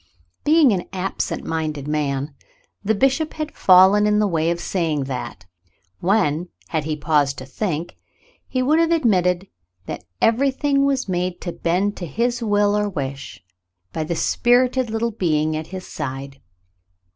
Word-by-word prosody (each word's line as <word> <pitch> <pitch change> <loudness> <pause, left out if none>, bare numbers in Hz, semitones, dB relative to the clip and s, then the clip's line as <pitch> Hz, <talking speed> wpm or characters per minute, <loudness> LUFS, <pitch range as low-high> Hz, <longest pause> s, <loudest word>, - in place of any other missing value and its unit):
Being 305 -3 +5
an 185 -3 -1
absent 190 0 -3
minded 155 -3 -3
man, 145 -1 -1 0.5
the 220 +2 +1
bishop 270 +7 +1
had 310 0 -4
fallen 190 +3 +6
in 210 0 +3
the 210 - +3
way 165 -4 0
of 170 0 -1
saying 165 -6 -1
that, 125 -9 -6 0.5
when, 175 -4 +1 0.2
had 155 -3 -1
he 155 -1 -1
paused 145 -2 +1
to 130 - -7
think, 165 +3 -4 0.5
he 255 -1 -1
would 305 +5 +3
have 330 0 +3
admitted 190 - +2 0.4
that - - -6
everything 275 +3 +2
was 270 -4 0
made 180 -1 -2
to 175 - -4
bend 185 +5 0
to 175 - -5
his 240 - -1
will 205 -2 +2
or 210 0 0
wish 140 - -6 0.5
by 160 - -2
the 170 +2 -3
spirited 250 +6 +2
little 225 +1 -1
being 155 -6 0
at 155 0 -4
his 185 -1 -7
side. 135 -1 -6
185 Hz, 155 wpm, -21 LUFS, 155-230 Hz, 0.5 s, fallen